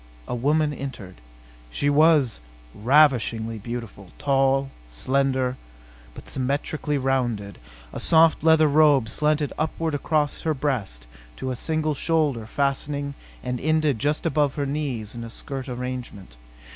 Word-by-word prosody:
A - - -4
woman 150 +5 +1
entered. 120 -10 -7 0.5
She 100 - -2
was 145 - +4 0.3
ravishingly 115 -3 +2
beautiful, 115 -4 -7
tall, 135 -1 +1 0.2
slender 130 - 0 0.6
but - - -11
symmetrically 145 +3 -2
rounded. 120 - -1 0.3
A - - -5
soft 160 -1 +4
leather 160 -1 +5
robe 145 -5 +4
slanted 150 +4 +1
upward 160 +1 -1
across 145 0 0
her 160 -1 0
breast 115 - -3 0.3
to 130 - -4
a - - -3
single 155 +3 -1
shoulder 145 -7 0
fastening 140 +2 -1 0.3
and 125 -1 -3
ended 155 -3 +1
just 150 +6 -1
above 150 -4 +1
her 145 - -1
knees 135 -7 -3
in 120 -1 -7
a 115 - -7
skirt 135 +3 -7
arrangement. 125 - -6
135 Hz, 130 wpm, -24 LUFS, 120-150 Hz, 0.6 s, leather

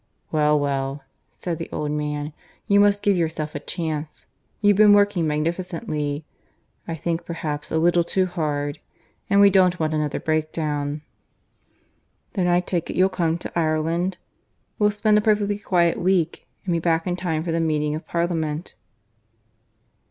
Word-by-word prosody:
"Well, 150 -1 +3
well," 140 0 -2 0.3
said 170 -2 -5
the 165 - -5
old 150 -1 -2
man. 150 0 -3 0.3
"You 200 -2 +4
must 205 0 +4
give 200 -1 +3
yourself 160 -3 -2
a 145 - -4
chance. 155 -2 -4 0.3
You've 205 -2 +4
been 210 -1 +7
working 205 -5 +3
magnificently; 155 -1 -2 0.6
I 165 - -3
think 165 +2 -2
perhaps 150 -3 -4
a - - +1
little 170 +1 +3
too 185 +2 +1
hard. 150 -5 -2 0.5
And 200 -1 +4
we 200 0 +7
don't 185 -2 +4
want 155 -1 0
another 150 -2 -1
breakdown.... 155 -2 -2 1.3
Then 185 -6 +1
I 175 0 +3
take 175 -2 -3
you'll 185 +1 +3
come 170 -3 0
to - - -7
Ireland? 165 +3 0 0.6
We'll 210 -1 +4
spend 210 0 +3
a - - 0
perfectly 205 -1 +1
quiet 175 -4 +2
week, 175 -2 0 0.2
and 180 - 0
be 170 - +1
back 165 0 +1
in 180 - -1
time 165 -3 -2
for 170 - -2
the 165 - 0
meeting 150 -2 0
of 155 - -6
Parliament." 165 -2 -2
165 Hz, 155 wpm, -23 LUFS, 150-185 Hz, 1.3 s, been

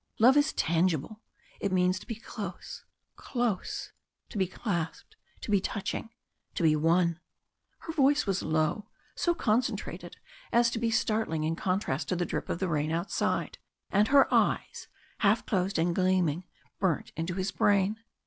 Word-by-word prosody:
Love 250 +5 +6
is 290 +1 +4
tangible 170 +4 0 0.4
it 200 - -1
means 185 0 +2
to - - -14
be 230 - -4
close 205 -4 -7 0.3
close 240 -7 -2 0.4
to 220 - -7
be 190 - +2
clasped 185 - -4 0.3
to - - -5
be 200 -2 +4
touching 205 +3 -3 0.5
to - - -1
be 155 -1 +5
One!" 170 +2 +2 0.6
Her 325 - -6
voice 290 0 +3
was 195 -2 0
low 155 +7 0 0.2
so 345 -1 +1
concentrated 240 -3 -1 0.3
as 235 0 +4
to 225 - -2
be 230 0 +1
startling 215 -8 0
in 160 +1 0
contrast 175 -6 -1
to - - +1
the 175 0 0
drip - - -4
of - - -1
the 190 - -1
rain 155 -2 0
outside, 170 +4 -1 0.3
and 205 +2 +4
her 275 +2 +6
eyes - - +1 0.3
half 215 +1 +3
closed 190 -1 0
and 170 +1 +2
gleaming 185 -2 +1 0.3
burnt 185 -6 0
into 165 +2 -3
his 190 +1 -1
brain. 205 +1 +2
190 Hz, 160 wpm, -29 LUFS, 170-220 Hz, 0.6 s, Love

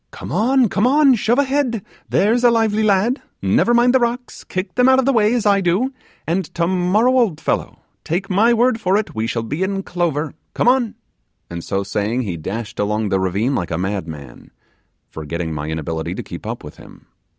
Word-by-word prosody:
Come - - -9
on, 250 +3 +3
come 210 +3 +1
on; 280 0 +5
shove 235 +1 +1
ahead, 270 -6 0 0.2
there's 230 +4 +2
a 240 - +7
lively 225 -2 +2
lad; 215 +5 +2 0.2
never - - +2
mind 240 +1 +4
the 260 - +5
rocks; 245 +1 -3
kick 185 +2 -4
them 250 +1 +4
out 260 - +5
of 260 - +2
the 275 - +3
way, 215 -2 +3
as 235 - -1
I 200 -1 +4
do; 195 +10 0 0.3
and 175 +4 0
tomorrow, 185 +7 +2
old 200 -11 +1
fellow, - - -2 0.2
take 180 +5 -2
my 210 +4 +3
word 235 0 +2
for 190 0 +2
it, 215 - -3
we 110 +1 -2
shall 115 0 -2
be 145 +10 -4
in 195 0 -1
clover. 160 -5 -2 0.2
Come - - +1
on;' 245 -3 +2 0.6
and 85 -1 -6
so 100 0 -2
saying, 105 +5 -1
he 95 -6 -4
dashed 105 +7 -6
along 105 +1 0
the 95 - +1
ravine 100 +8 0
like 90 -9 -2
a 80 - -2
madman, 80 -9 -5 0.6
forgetting 80 +1 -5
my 75 -1 -4
inability 80 0 -3
to - - -5
keep - - -9
up - - -5
with - - -11
him. - - -15
190 Hz, 200 wpm, -19 LUFS, -, 0.6 s, a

